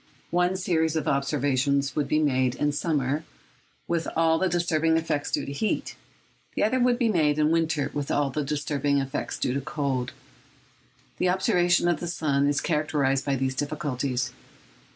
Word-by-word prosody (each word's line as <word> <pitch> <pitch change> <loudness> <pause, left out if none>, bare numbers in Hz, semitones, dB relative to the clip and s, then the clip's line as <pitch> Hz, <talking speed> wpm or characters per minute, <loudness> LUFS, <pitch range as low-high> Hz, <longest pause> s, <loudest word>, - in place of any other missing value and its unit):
One 180 +1 +2
series 160 -4 0
of 155 -2 -1
observations 140 0 +1
would 145 -2 0
be 150 - +1
made 130 -4 +2
in 145 0 0
summer, 145 -1 -1 0.6
with 170 -1 -1
all 160 0 +3
the 190 - +1
disturbing 165 -2 +2
effects 155 -3 -1
due - - 0
to - - -6
heat; 210 +10 -2 0.6
the - - +1
other 255 +5 +2
would 245 -1 +3
be 240 -2 +2
made 155 -8 +2
in 155 0 +3
winter, 160 -3 +1
with 145 -1 -3
all 145 -1 +1
the 150 +3 -2
disturbing 145 -1 0
effects 135 +1 -3
due 125 - -1
to 140 - -1
cold. 140 -4 -2 1.1
The 180 - +2
observation 175 -2 +2
of 175 -3 +1
the 175 - -4
sun 145 -5 +1
is 145 0 +1
characterised 145 -4 0
by 140 - 0
all - - 0
these 130 0 -1
difficulties. 140 -3 -2
150 Hz, 175 wpm, -26 LUFS, 140-165 Hz, 1.1 s, all